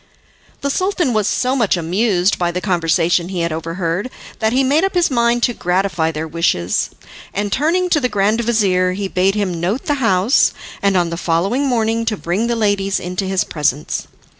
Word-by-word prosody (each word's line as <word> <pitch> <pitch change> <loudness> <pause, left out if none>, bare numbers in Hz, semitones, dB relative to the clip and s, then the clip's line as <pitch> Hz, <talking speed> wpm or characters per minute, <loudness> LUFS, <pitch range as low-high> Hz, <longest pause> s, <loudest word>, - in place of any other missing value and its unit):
The 280 - -1
Sultan 370 -6 0
was 215 -2 +1
so 255 +1 0
much 225 -8 +2
amused 185 +2 +1
by 175 -1 +1
the 175 +1 -2
conversation 175 -1 +1
he 185 -3 -3
had 170 -1 -1
overheard, 165 +6 -3 0.3
that 220 -1 +1
he 260 +3 +2
made 290 +6 +2
up 390 0 0
his 350 -4 +2
mind 235 -1 +2
to 240 - +2
gratify 180 -4 0
their 160 0 -4
wishes, 155 - 0 0.5
and 205 +1 -1
turning 335 - +1
to 305 - +4
the 250 -3 0
grand 210 +2 +1
vizir, 195 -6 +1
he 195 +1 -3
bade 190 +1 +1
him 190 -5 -1
note 200 +9 -1
the 285 -2 -1
house, 200 +2 +3 0.3
and 200 -1 +2
on 175 -2 +1
the 170 - -3
following 190 +12 0
morning 230 -2 0
to 220 -2 -1
bring 185 +8 -1
the 235 - 0
ladies 205 -3 0
into 180 +2 -3
his 190 -1 0
presence. 150 -2 -2
195 Hz, 190 wpm, -18 LUFS, 175-235 Hz, 0.5 s, to